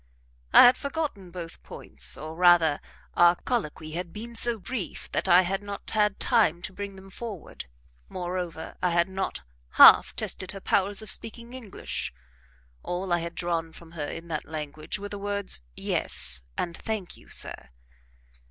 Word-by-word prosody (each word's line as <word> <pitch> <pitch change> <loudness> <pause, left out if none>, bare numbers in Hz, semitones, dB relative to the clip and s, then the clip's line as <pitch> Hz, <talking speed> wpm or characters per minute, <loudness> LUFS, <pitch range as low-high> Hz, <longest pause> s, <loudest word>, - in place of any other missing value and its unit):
I - - +10
had 245 +1 +6
forgotten 280 - -4
both 170 -1 -8
points, - - -2
or, 155 +1 -7
rather, 170 -3 +5 0.3
our 175 0 +6
colloquy 160 -9 -3
had 175 +1 -5
been 230 +5 -8
so 235 0 +3
brief 215 -1 -6
that - - -1
I 180 0 +7
had 195 +2 -2
not 205 -1 -5
had 210 -2 +2
time 175 -7 +3
to 190 - -5
bring 200 0 -6
them 190 0 -13
forward; 210 - -7 0.4
moreover, 175 -2 -5
I 180 - +2
had 170 +1 +2
not 190 - -4 0.3
half - - +8
tested 185 +1 -3
her 195 - -7
powers 200 +2 +1
of 210 - -8
speaking 235 +3 -7
English; 235 -7 -5 0.7
all 180 0 -2
I 175 - +3
had 170 0 -6
drawn 165 -2 -2
from 165 -1 -14
her 155 -3 -4
in 165 +3 -7
that 155 -2 -3
language 155 +1 -5
were 205 +1 -7
the 205 - -6
words 200 - -1
"Yes," 65 +1 0
and 170 -1 -2
"Thank 215 -4 -4
you, - - -16
sir." 65 - -2
185 Hz, 165 wpm, -27 LUFS, 170-205 Hz, 0.7 s, I